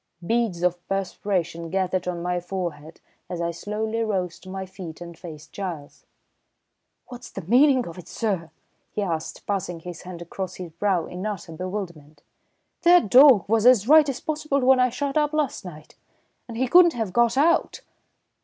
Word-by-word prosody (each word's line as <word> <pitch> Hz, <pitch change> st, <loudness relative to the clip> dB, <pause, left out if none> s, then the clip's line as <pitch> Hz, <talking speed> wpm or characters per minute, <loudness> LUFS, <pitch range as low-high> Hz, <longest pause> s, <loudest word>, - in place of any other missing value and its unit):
Beads 225 Hz, -5 st, 0 dB
of 180 Hz, 0 st, +1 dB
perspiration 185 Hz, -3 st, -2 dB
gathered 185 Hz, 0 st, -1 dB
on 175 Hz, -1 st, -3 dB
my 180 Hz, 0 st, -1 dB
forehead 170 Hz, -4 st, -6 dB, 0.3 s
as 175 Hz, -, -4 dB
I 170 Hz, 0 st, -1 dB
slowly 215 Hz, +5 st, -3 dB
rose 185 Hz, -5 st, -2 dB
to 185 Hz, -, -13 dB
my 190 Hz, 0 st, -5 dB
feet 185 Hz, -4 st, -9 dB
and 170 Hz, -1 st, -9 dB
faced 160 Hz, -3 st, -11 dB
Giles. 170 Hz, -7 st, -7 dB, 1.0 s
"What's 245 Hz, -1 st, -10 dB
the 195 Hz, -, -8 dB
meaning 255 Hz, -, +4 dB
of 170 Hz, +2 st, -9 dB
it, 180 Hz, -, -12 dB
sir?" 190 Hz, -8 st, -2 dB, 0.4 s
he 210 Hz, -, -2 dB
asked, 165 Hz, -3 st, -4 dB
passing 180 Hz, -4 st, -3 dB
his 175 Hz, -1 st, -8 dB
hand 180 Hz, -1 st, -9 dB
across 185 Hz, +2 st, -6 dB
his 180 Hz, -3 st, -8 dB
brow 180 Hz, 0 st, 0 dB
in 180 Hz, +1 st, -7 dB
utter 200 Hz, -5 st, -6 dB
bewilderment. 165 Hz, -5 st, -7 dB, 0.6 s
"That 345 Hz, -, +5 dB
dawg 260 Hz, -, +7 dB
was 225 Hz, +2 st, +3 dB
as 240 Hz, -4 st, +5 dB
right 305 Hz, 0 st, +7 dB
as 270 Hz, -, -3 dB
possible 305 Hz, -2 st, -1 dB
when 260 Hz, 0 st, +5 dB
I 250 Hz, 0 st, +4 dB
shut 280 Hz, +4 st, -2 dB
up 300 Hz, 0 st, 0 dB
last 305 Hz, -3 st, -1 dB
night, 155 Hz, -4 st, -11 dB, 0.5 s
and 230 Hz, -2 st, -7 dB
he 260 Hz, +2 st, +1 dB
couldn't 345 Hz, +4 st, +6 dB
have 220 Hz, -5 st, -3 dB
got 235 Hz, +1 st, +3 dB
out." 330 Hz, +4 st, +2 dB
190 Hz, 170 wpm, -24 LUFS, 170-240 Hz, 1.0 s, dawg